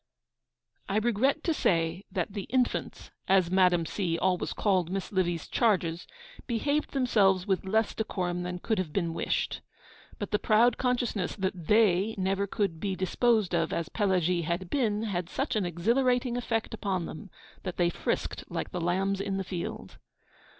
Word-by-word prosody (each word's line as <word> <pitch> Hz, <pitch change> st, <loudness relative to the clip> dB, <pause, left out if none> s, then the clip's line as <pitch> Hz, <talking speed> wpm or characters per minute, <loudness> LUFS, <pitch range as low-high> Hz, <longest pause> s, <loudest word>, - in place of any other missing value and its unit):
I 195 Hz, -, +1 dB
regret 240 Hz, +4 st, +1 dB
to 330 Hz, -, +1 dB
say 170 Hz, -, 0 dB
that 190 Hz, -1 st, -2 dB
'the 200 Hz, -3 st, -4 dB
infants,' 250 Hz, 0 st, -1 dB, 0.2 s
as 185 Hz, -2 st, +3 dB
Madame 180 Hz, -3 st, +4 dB
C. 170 Hz, -2 st, -1 dB
always 180 Hz, 0 st, 0 dB
called 185 Hz, -5 st, +1 dB
Miss 195 Hz, 0 st, -3 dB
Livy's 175 Hz, -4 st, 0 dB
charges, 180 Hz, -7 st, +1 dB, 0.4 s
behaved 285 Hz, +6 st, 0 dB
themselves 200 Hz, -8 st, +3 dB
with 190 Hz, -2 st, 0 dB
less 220 Hz, +3 st, +1 dB
decorum 180 Hz, -5 st, -2 dB
than 180 Hz, 0 st, -4 dB
could 215 Hz, +3 st, -1 dB
have 175 Hz, -5 st, -2 dB
been 170 Hz, -4 st, 0 dB
wished. -, -, -1 dB, 0.6 s
But 205 Hz, -, -5 dB
the 210 Hz, -, +2 dB
proud 225 Hz, +2 st, +4 dB
consciousness 245 Hz, -7 st, 0 dB
that 185 Hz, -4 st, -3 dB
they 210 Hz, -1 st, +4 dB
never 195 Hz, +1 st, 0 dB
could 195 Hz, -5 st, -1 dB
be 195 Hz, +2 st, -2 dB
disposed 210 Hz, +1 st, +1 dB
of 165 Hz, -1 st, +1 dB
as 170 Hz, 0 st, -2 dB
Pelagie 180 Hz, -4 st, +1 dB
had 170 Hz, +2 st, -3 dB
been 220 Hz, -6 st, +1 dB
had 180 Hz, -5 st, -2 dB
such 265 Hz, +2 st, -2 dB
an 200 Hz, -4 st, +1 dB
exhilarating 245 Hz, -, +1 dB
effect 225 Hz, -3 st, -2 dB
upon 195 Hz, -5 st, -2 dB
them 165 Hz, +6 st, -8 dB, 0.3 s
that 185 Hz, -3 st, -5 dB
they 175 Hz, -1 st, +2 dB
frisked -, -, -2 dB
like -, -, -4 dB
the 180 Hz, -, -3 dB
lambs 190 Hz, +3 st, 0 dB
in 200 Hz, -1 st, -2 dB
the 195 Hz, -, -1 dB
field. 175 Hz, -2 st, -6 dB
195 Hz, 165 wpm, -29 LUFS, 180-220 Hz, 0.6 s, Madame